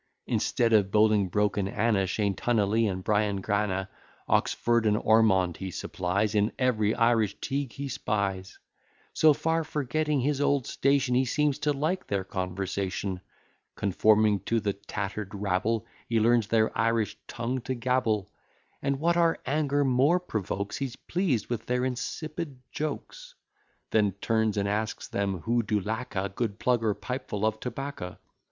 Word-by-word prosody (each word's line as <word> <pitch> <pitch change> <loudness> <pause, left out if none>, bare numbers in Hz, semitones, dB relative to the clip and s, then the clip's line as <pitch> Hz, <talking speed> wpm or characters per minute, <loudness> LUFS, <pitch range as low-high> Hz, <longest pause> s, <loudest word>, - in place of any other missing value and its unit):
Instead 115 -1 +1
of 100 -3 +4
Bolingbroke 105 -1 +2
and 100 -1 0
Anna, 105 -3 +1
Shane 100 +1 0
Tunnally, 110 +1 +1
and 95 0 -5
Bryan 105 -1 +1
Granna, 95 -1 -1 0.4
Oxford 120 -1 +2
and 105 0 +3
Ormond 105 -6 +3
he 95 - -5
supplies, 95 +4 -1
In 105 +1 +2
every 110 -5 +2
Irish 115 -4 +2
Teague 135 -3 -3
he 140 0 -5
spies: 100 -7 -2 0.6
So 155 0 +6
far 160 +3 0
forgetting 150 0 -1
his 145 +2 0
old 140 -3 +2
station, 135 -2 +1
He 130 +2 +4
seems 145 +2 +1
to 150 - +1
like 155 +7 -1
their 100 -2 -1
conversation, 95 0 -3 0.5
Conforming 105 +1 +3
to 115 - +1
the 100 -2 -1
tatter'd 100 0 -5
rabble, 105 +3 0 0.2
He 115 -1 +2
learns 115 -1 +3
their 110 -1 +2
Irish 115 -2 +1
tongue 125 +2 -3
to 130 - -3
gabble; 120 -5 0 0.5
And, 140 0 -1
what 170 +2 +2
our 165 -1 +3
anger 145 0 +1
more 135 +7 +3
provokes, 100 - -3
He's 135 -3 -3
pleased 170 - -1
with 115 -2 -4
their 125 +1 +1
insipid 145 +3 -4
jokes; - - -5 0.6
Then 105 -3 +3
turns 110 +1 0
and 100 0 +1
asks 105 +1 -2
them 100 -3 -2
who 120 +4 +1
do 105 -1 0
lack 110 +5 -4
a 95 +1 0
Good 100 +1 -3
plug, 120 -1 +1
or 105 -2 +1
pipefull 110 -1 -3
of 110 0 0
tobacco. 125 -7 -5
110 Hz, 150 wpm, -28 LUFS, 100-130 Hz, 0.6 s, So